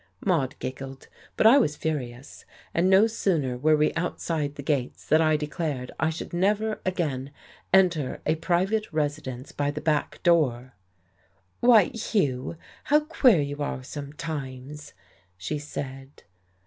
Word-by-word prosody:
Maude 155 Hz, -9 st, +1 dB
giggled, 135 Hz, +1 st, -7 dB, 0.3 s
but -, -, +2 dB
I 245 Hz, +6 st, +8 dB
was 150 Hz, -, +1 dB
furious. 135 Hz, -5 st, -5 dB, 0.3 s
And 175 Hz, +3 st, +2 dB
no 190 Hz, +3 st, +6 dB
sooner 170 Hz, -, 0 dB
were 155 Hz, +5 st, +3 dB
we 150 Hz, 0 st, +2 dB
outside 160 Hz, -3 st, -2 dB
the 140 Hz, -, -7 dB
gates 135 Hz, -4 st, -2 dB
than 155 Hz, +2 st, +4 dB
I 155 Hz, -1 st, +3 dB
declared 150 Hz, -4 st, -3 dB
I 160 Hz, -, +2 dB
should 160 Hz, +2 st, -6 dB
never 210 Hz, +4 st, +1 dB
again 145 Hz, -8 st, -1 dB, 0.4 s
enter 175 Hz, -8 st, +3 dB
a 155 Hz, -, +3 dB
private 185 Hz, +6 st, 0 dB
residence 145 Hz, -4 st, -3 dB
by 145 Hz, 0 st, -1 dB
the 145 Hz, +1 st, -3 dB
back 150 Hz, -1 st, -1 dB
door. 130 Hz, -8 st, +2 dB, 0.9 s
"Why, 230 Hz, -6 st, +6 dB
Hugh, 155 Hz, -, -1 dB, 0.3 s
how 300 Hz, +1 st, +4 dB
queer 265 Hz, -, +4 dB
you 145 Hz, +1 st, -4 dB
are 135 Hz, -2 st, -3 dB
sometimes," 145 Hz, -1 st, -7 dB, 0.4 s
she 125 Hz, +12 st, -3 dB
said. 135 Hz, -2 st, -8 dB
150 Hz, 135 wpm, -26 LUFS, 135-175 Hz, 0.9 s, I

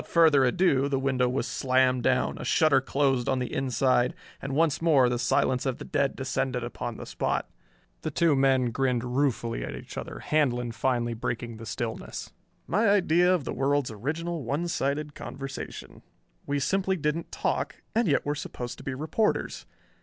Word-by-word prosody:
Without -, -, -16 dB
further 160 Hz, -5 st, +6 dB
ado 140 Hz, -1 st, +2 dB
the 140 Hz, -, +1 dB
window 130 Hz, -2 st, +1 dB
was 130 Hz, -, -1 dB
slammed 130 Hz, -1 st, +2 dB
down, -, -, +1 dB
a -, -, -5 dB
shutter 145 Hz, -4 st, +4 dB
closed 135 Hz, -2 st, +1 dB
on -, -, +2 dB
the 125 Hz, -1 st, -3 dB
inside, 130 Hz, -1 st, +1 dB, 0.3 s
and 135 Hz, 0 st, -4 dB
once 160 Hz, -1 st, +2 dB
more 145 Hz, -6 st, +5 dB
the 120 Hz, -1 st, -1 dB
silence 125 Hz, +1 st, +1 dB
of 130 Hz, -3 st, -1 dB
the -, -, -8 dB
dead 140 Hz, -1 st, 0 dB
descended 130 Hz, -2 st, -2 dB
upon 120 Hz, -1 st, -5 dB
the -, -, -7 dB
spot. -, -, -1 dB, 0.5 s
The -, -, -2 dB
two 165 Hz, -3 st, +3 dB
men 135 Hz, -2 st, +3 dB
grinned 125 Hz, -1 st, 0 dB
ruefully 125 Hz, -2 st, -1 dB
at -, -, -5 dB
each -, -, -7 dB
other, -, -, -7 dB
Handlon 125 Hz, -6 st, 0 dB
finally 120 Hz, -1 st, 0 dB
breaking 115 Hz, 0 st, -4 dB
the 115 Hz, 0 st, -9 dB
stillness. 115 Hz, -3 st, -5 dB, 0.3 s
"My 210 Hz, +5 st, +2 dB
idea 180 Hz, -3 st, +4 dB
of 180 Hz, -5 st, +2 dB
the -, -, -4 dB
world's 140 Hz, -2 st, +1 dB
original 160 Hz, +9 st, -3 dB
one 145 Hz, +8 st, -1 dB
sided 145 Hz, -1 st, -1 dB
conversation. 135 Hz, -1 st, -7 dB, 0.5 s
We 145 Hz, -, 0 dB
simply 190 Hz, +5 st, +1 dB
didn't 155 Hz, +1 st, -2 dB
talk -, -, -1 dB, 0.2 s
and 230 Hz, -1 st, +2 dB
yet 145 Hz, -, +2 dB
we're 145 Hz, -, 0 dB
supposed 125 Hz, -4 st, -6 dB
to -, -, -10 dB
be 135 Hz, -, -3 dB
reporters. 160 Hz, +10 st, -1 dB
135 Hz, 175 wpm, -27 LUFS, 125-155 Hz, 0.5 s, further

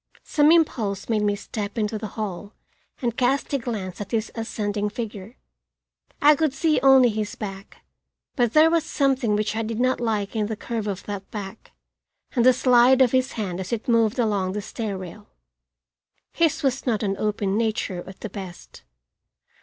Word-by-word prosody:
Some 300 Hz, +1 st, +3 dB
impulse 225 Hz, -, +1 dB
made 220 Hz, -2 st, +1 dB
me 205 Hz, -1 st, +1 dB
step 205 Hz, +1 st, -6 dB
into 215 Hz, 0 st, -1 dB
the 215 Hz, -, -5 dB
hall 205 Hz, -1 st, -5 dB, 0.5 s
and 235 Hz, -2 st, 0 dB
cast 265 Hz, +4 st, 0 dB
a 280 Hz, -, +2 dB
glance 210 Hz, -6 st, -5 dB
at 200 Hz, -, -6 dB
his 225 Hz, -1 st, -2 dB
ascending 210 Hz, -2 st, -2 dB
figure. 215 Hz, 0 st, -7 dB, 0.8 s
I 295 Hz, +1 st, +6 dB
could 300 Hz, -2 st, 0 dB
see 305 Hz, 0 st, +2 dB
only 265 Hz, -2 st, +6 dB
his 215 Hz, -1 st, -3 dB
back, 195 Hz, -1 st, -8 dB, 0.5 s
but 240 Hz, -3 st, +1 dB
there 315 Hz, +1 st, +6 dB
was 335 Hz, -2 st, +2 dB
something 270 Hz, -8 st, +1 dB
which 210 Hz, 0 st, -1 dB
I 225 Hz, -, 0 dB
did 225 Hz, 0 st, -4 dB
not 255 Hz, +1 st, +2 dB
like 215 Hz, -3 st, -1 dB
in 215 Hz, -2 st, 0 dB
the 220 Hz, -, -3 dB
curve 220 Hz, 0 st, -4 dB
of 195 Hz, -2 st, -4 dB
that 200 Hz, -2 st, -6 dB
back 205 Hz, 0 st, -8 dB, 0.6 s
and 240 Hz, -, +3 dB
the 255 Hz, -, +8 dB
slide 250 Hz, +1 st, +5 dB
of 255 Hz, -3 st, +5 dB
his 255 Hz, 0 st, +1 dB
hand 190 Hz, -5 st, -4 dB
as 190 Hz, 0 st, -5 dB
it 230 Hz, -2 st, -3 dB
moved 230 Hz, -1 st, +2 dB
along 205 Hz, -6 st, 0 dB
the 210 Hz, -, -3 dB
stair 210 Hz, -2 st, -4 dB
rail. 190 Hz, +3 st, -10 dB, 1.0 s
His 320 Hz, -1 st, +1 dB
was 270 Hz, 0 st, 0 dB
not 225 Hz, -2 st, +1 dB
an 195 Hz, -1 st, 0 dB
open 205 Hz, -2 st, -1 dB
nature 215 Hz, -5 st, -1 dB
at 190 Hz, -, -12 dB
the 220 Hz, -, -5 dB
best. 185 Hz, -, -9 dB
220 Hz, 180 wpm, -24 LUFS, 205-255 Hz, 1.0 s, the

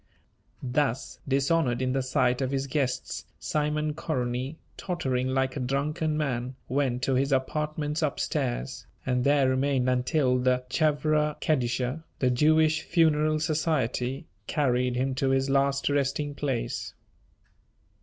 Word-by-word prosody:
Thus 135 Hz, 0 st, -1 dB
dishonoured 135 Hz, -1 st, +2 dB
in 130 Hz, 0 st, 0 dB
the 135 Hz, -, +1 dB
sight 130 Hz, -1 st, +1 dB
of 130 Hz, -, 0 dB
his 135 Hz, 0 st, -1 dB
guests, 135 Hz, -2 st, -2 dB
Simon 150 Hz, 0 st, -1 dB
Koronyi, 130 Hz, -2 st, -2 dB, 0.2 s
tottering 130 Hz, -9 st, -1 dB
like 130 Hz, 0 st, 0 dB
a -, -, -3 dB
drunken 150 Hz, +4 st, -1 dB
man, 130 Hz, -4 st, -2 dB
went 130 Hz, -2 st, 0 dB
to 135 Hz, -, +1 dB
his 135 Hz, +2 st, +1 dB
apartments 150 Hz, +3 st, -1 dB
up 150 Hz, -3 st, -1 dB
stairs, -, -, -2 dB, 0.2 s
and 125 Hz, -1 st, +1 dB
there 140 Hz, -1 st, +4 dB
remained 130 Hz, 0 st, +1 dB
until 125 Hz, +1 st, +2 dB
the 125 Hz, 0 st, +2 dB
"Chevra 150 Hz, 0 st, +1 dB
Kedisha," 130 Hz, +1 st, 0 dB
the 130 Hz, -1 st, +2 dB
Jewish 155 Hz, +4 st, +3 dB
Funeral 155 Hz, -2 st, +2 dB
Society, 150 Hz, -5 st, -1 dB, 0.2 s
carried 125 Hz, -4 st, +1 dB
him 130 Hz, +2 st, 0 dB
to 135 Hz, +1 st, 0 dB
his 135 Hz, 0 st, +1 dB
last 140 Hz, 0 st, +2 dB
resting 145 Hz, +1 st, 0 dB
place. 135 Hz, -5 st, -3 dB
135 Hz, 130 wpm, -27 LUFS, 125-150 Hz, 0.2 s, there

